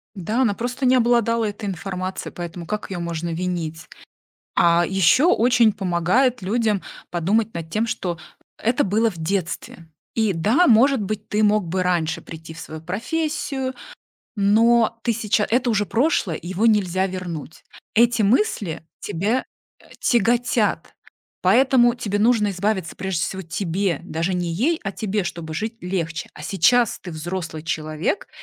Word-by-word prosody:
Да, 210 Hz, +6 st, -1 dB
она 230 Hz, -6 st, +3 dB
просто 245 Hz, +5 st, -3 dB
не 255 Hz, +1 st, +5 dB
обладала 230 Hz, -2 st, +2 dB
этой 205 Hz, 0 st, -5 dB
информацией, 185 Hz, 0 st, -4 dB
поэтому 175 Hz, 0 st, -6 dB
как 210 Hz, +5 st, -4 dB
её 185 Hz, -2 st, -4 dB
можно 170 Hz, 0 st, -3 dB
винить? 165 Hz, -2 st, -3 dB, 0.7 s
А 170 Hz, 0 st, +4 dB
ещё 195 Hz, -, +4 dB
очень 235 Hz, -, +4 dB
помогает 195 Hz, +7 st, +1 dB
людям 215 Hz, 0 st, 0 dB, 0.3 s
подумать 205 Hz, +6 st, 0 dB
над 165 Hz, -1 st, -6 dB
тем, 215 Hz, +7 st, 0 dB
что 175 Hz, -6 st, -3 dB, 0.4 s
это 235 Hz, +2 st, +1 dB
было 220 Hz, +4 st, +2 dB
в 175 Hz, -, -12 dB
детстве. 170 Hz, -1 st, -3 dB, 0.3 s
И 220 Hz, -3 st, +2 dB
да, 220 Hz, -, +3 dB
может 255 Hz, +3 st, +5 dB
быть, 210 Hz, +1 st, -4 dB
ты 210 Hz, +1 st, +1 dB
мог 210 Hz, -2 st, +2 dB
бы 185 Hz, +2 st, 0 dB
раньше 175 Hz, -3 st, 0 dB
прийти 160 Hz, 0 st, -10 dB
в 165 Hz, -, -10 dB
свою 160 Hz, -1 st, -8 dB
профессию, 265 Hz, -, -2 dB, 0.6 s
но 225 Hz, +3 st, +3 dB
ты 235 Hz, -, +2 dB
сейча 210 Hz, -1 st, +1 dB
это 245 Hz, +2 st, +2 dB
уже 210 Hz, -2 st, +1 dB
прошлое, 230 Hz, -, +1 dB
его 185 Hz, +6 st, 0 dB
нельзя 190 Hz, -4 st, +2 dB
вернуть. 175 Hz, -5 st, -6 dB, 0.3 s
Эти 235 Hz, 0 st, +4 dB
мысли 205 Hz, -, +1 dB, 0.2 s
тебя, 210 Hz, +10 st, -1 dB, 0.4 s
а, -, -, -20 dB
тяготят. 240 Hz, +1 st, +1 dB, 0.5 s
Поэтому 250 Hz, -2 st, +4 dB
тебе 210 Hz, -5 st, -2 dB
нужно 220 Hz, -1 st, +3 dB
избавиться, 190 Hz, -2 st, -2 dB
прежде 190 Hz, -3 st, -2 dB
всего 190 Hz, +2 st, -3 dB
тебе, 175 Hz, +1 st, -2 dB
даже 170 Hz, +1 st, -2 dB
не 175 Hz, -1 st, -1 dB
ей, 310 Hz, -, +1 dB
а 195 Hz, -, -2 dB
тебе, 205 Hz, -1 st, -2 dB
чтобы 170 Hz, -2 st, -5 dB
жить 220 Hz, +6 st, -3 dB
легче. 170 Hz, -3 st, -3 dB
А -, -, -11 dB
сейчас 225 Hz, +4 st, +3 dB
ты 180 Hz, -, -8 dB
взрослый 165 Hz, 0 st, -5 dB
человек 155 Hz, -, -2 dB
200 Hz, 150 wpm, -22 LUFS, 175-230 Hz, 0.7 s, не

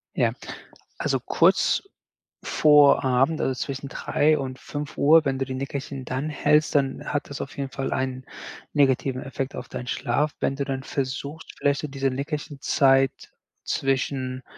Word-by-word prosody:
Ja, -, -, +2 dB, 0.7 s
also, -, -, 0 dB
kurz -, -, +3 dB, 0.6 s
vor 150 Hz, -2 st, +5 dB
Abend, 135 Hz, +5 st, +2 dB
also, 130 Hz, -, +1 dB
zwischen 135 Hz, +2 st, -5 dB
3:00 150 Hz, +2 st, +1 dB
und 130 Hz, -2 st, -5 dB
5:00, 150 Hz, +2 st, +2 dB
wenn 135 Hz, -1 st, 0 dB
du 135 Hz, -, 0 dB
die 130 Hz, -, -5 dB
Nickerchen 135 Hz, 0 st, -5 dB
dann 130 Hz, +5 st, -3 dB
hältst, 150 Hz, 0 st, +2 dB
dann 135 Hz, -2 st, +1 dB
hat 145 Hz, -, -2 dB
das 140 Hz, -, -5 dB
auf 135 Hz, -, -7 dB
jeden 135 Hz, -1 st, -3 dB
Fall 135 Hz, 0 st, -3 dB
ein 130 Hz, -1 st, -2 dB, 0.5 s
negativen 135 Hz, -2 st, +2 dB
Effekt 135 Hz, -1 st, -4 dB
auf -, -, -6 dB
deinen 125 Hz, -, -6 dB
Schlaf. 140 Hz, +4 st, 0 dB
Wenn 135 Hz, -, 0 dB
du 140 Hz, -, -2 dB
dann 135 Hz, -1 st, -4 dB
versuchst, 140 Hz, +3 st, -4 dB
vielleicht 140 Hz, 0 st, +1 dB
so 150 Hz, -, -3 dB
diese 135 Hz, -1 st, -1 dB
Nickerchenzeit 135 Hz, -1 st, +1 dB, 0.5 s
zwischen 130 Hz, -1 st, -1 dB
135 Hz, 150 wpm, -25 LUFS, 130-145 Hz, 0.7 s, vor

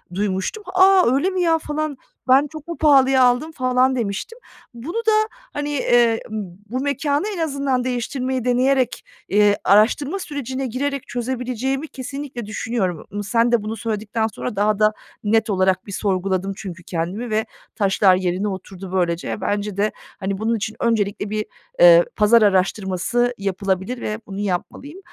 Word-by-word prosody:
duymuştum. 200 Hz, -, -2 dB
"A, 375 Hz, -7 st, +5 dB
öyle 285 Hz, +8 st, +2 dB
mi 375 Hz, -1 st, -1 dB
ya 330 Hz, -2 st, +3 dB
falan, 305 Hz, -2 st, -3 dB, 0.3 s
ben 270 Hz, +3 st, +5 dB
çok 310 Hz, +1 st, -11 dB
mu 340 Hz, -, -5 dB
pahalıya 270 Hz, -3 st, +5 dB
aldım 250 Hz, +6 st, +2 dB
falan?" 255 Hz, -2 st, +2 dB
demiştim. 235 Hz, -, -4 dB, 0.3 s
Bunu 285 Hz, -, -6 dB
da, 440 Hz, -, +6 dB, 0.4 s
hani, 290 Hz, 0 st, -3 dB
eee, 240 Hz, -4 st, +3 dB, 0.5 s
bu 255 Hz, +3 st, -2 dB
mekânı 285 Hz, +3 st, 0 dB
en -, -, -7 dB
azından 275 Hz, -5 st, 0 dB
değiştirmeyi 255 Hz, 0 st, -2 dB
deneyerek, 255 Hz, 0 st, +1 dB, 0.3 s
iii, 205 Hz, 0 st, +4 dB
araştırma 245 Hz, -, +3 dB
sürecine 270 Hz, -5 st, -4 dB
girerek 275 Hz, +3 st, -3 dB
çözebileceğimi 255 Hz, +3 st, -3 dB
kesinlikle 270 Hz, -3 st, -6 dB
düşünüyorum. 205 Hz, -5 st, -2 dB
Mı 205 Hz, 0 st, -4 dB
sen 230 Hz, +3 st, +2 dB
de 235 Hz, -3 st, +2 dB
bunu 215 Hz, +1 st, -4 dB
söyledikten 220 Hz, +1 st, -2 dB
sonra 225 Hz, +2 st, -5 dB
daha 205 Hz, +1 st, +1 dB
da 215 Hz, 0 st, +4 dB, 0.3 s
net 220 Hz, +1 st, +2 dB
olarak 185 Hz, -1 st, +1 dB
bir -, -, -7 dB
sorguladım 190 Hz, 0 st, -1 dB
çünkü 175 Hz, -4 st, -8 dB
kendimi 180 Hz, +9 st, -3 dB
ve 220 Hz, 0 st, 0 dB, 0.3 s
taşlar 195 Hz, -2 st, +4 dB
yerine 185 Hz, +2 st, -1 dB
oturdu 190 Hz, -1 st, -7 dB
böylece. 175 Hz, -2 st, 0 dB
E, -, -, -5 dB
bence 205 Hz, 0 st, -2 dB
de, 210 Hz, +1 st, +1 dB, 0.3 s
hani, 195 Hz, 0 st, -2 dB
bunun 225 Hz, +2 st, 0 dB
için 215 Hz, 0 st, -4 dB
öncelikle 205 Hz, -3 st, 0 dB
bir, 215 Hz, 0 st, -2 dB, 0.4 s
ııı, -, -, +8 dB
pazar 225 Hz, +2 st, +5 dB
araştırması 200 Hz, +4 st, +1 dB
yapılabilir 195 Hz, +4 st, -2 dB
ve 215 Hz, +1 st, -3 dB
bunu 195 Hz, 0 st, -6 dB
yapmalıyım. 205 Hz, -, -4 dB
230 Hz, 155 wpm, -21 LUFS, 200-270 Hz, 0.5 s, ııı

